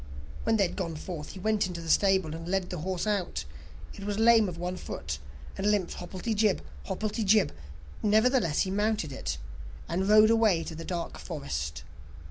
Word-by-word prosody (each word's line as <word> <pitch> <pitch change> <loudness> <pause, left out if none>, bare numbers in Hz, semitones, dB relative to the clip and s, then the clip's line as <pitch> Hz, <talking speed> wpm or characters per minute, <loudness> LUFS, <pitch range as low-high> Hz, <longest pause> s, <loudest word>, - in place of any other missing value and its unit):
When 225 0 +3
they 200 - +4
had - - -8
gone 170 -5 -3
forth, 155 -1 -6
he 190 - -9
went 215 0 +1
into 175 -2 -5
the 165 - -7
stable, 190 -2 +3
and 165 +1 -6
led 190 -1 0
the 180 - -3
horse 185 +4 -2
out; 200 - -1 0.5
it 200 - -9
was 205 0 -2
lame 225 -2 +6
of 170 - -7
one 180 +2 -3
foot, 70 - -5 0.4
and 200 +2 0
limped 200 -4 +1
hobblety 185 +5 -3
jib, 210 -2 +2 0.2
hobblety 215 - -2
jib; 205 0 +4 0.5
nevertheless 215 - +3
he 190 - 0
mounted 205 -6 0
it, 135 - -3 0.5
and 190 +4 -1
rode 215 +1 +7
away 215 -7 +4
to 165 - -6
the 165 +1 -7
dark 175 -2 -4
forest. 70 0 -4
190 Hz, 185 wpm, -29 LUFS, 170-215 Hz, 0.5 s, rode